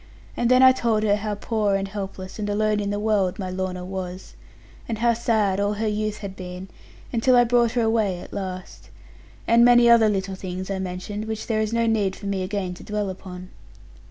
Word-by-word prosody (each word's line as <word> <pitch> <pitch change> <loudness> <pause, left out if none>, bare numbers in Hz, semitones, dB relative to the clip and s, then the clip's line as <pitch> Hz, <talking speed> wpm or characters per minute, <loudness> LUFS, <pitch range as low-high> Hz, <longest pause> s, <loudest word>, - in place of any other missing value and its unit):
And 240 - 0
then 255 +1 +6
I 260 - +9
told 230 -4 0
her 205 -1 +3
how 210 0 -3
poor, 210 -1 0
and 195 0 -1
helpless, 195 -1 -7
and 205 -1 -2
alone 210 0 +1
in 200 -1 -2
the 205 - -1
world, 205 -4 +1
my 185 -2 -4
Lorna 185 -1 -4
was; 185 0 -6 0.6
and 225 - -2
how 235 +1 +3
sad 220 -4 +1
all 205 +1 +1
her 215 +1 -2
youth 210 0 -2
had 190 -1 -7
been, 180 0 -8 0.4
until 245 +2 +3
I 245 - +7
brought 240 -1 +2
her 240 - +1
away 220 -5 +1
at - - -11
last. 185 -2 -7 0.6
And 230 +1 +5
many 240 0 +6
other 230 -2 +6
little 195 -1 -2
things 185 0 -5
I 195 - -2
mentioned, 190 +3 -5
which 220 -1 -4
there 220 -2 0
is 215 0 -1
no 230 0 +1
need 210 -4 +1
for - - -11
me 200 -1 -1
again 185 -1 -3
to 180 - -12
dwell 210 -2 -2
upon. 185 -1 -10
205 Hz, 215 wpm, -23 LUFS, 190-225 Hz, 0.6 s, I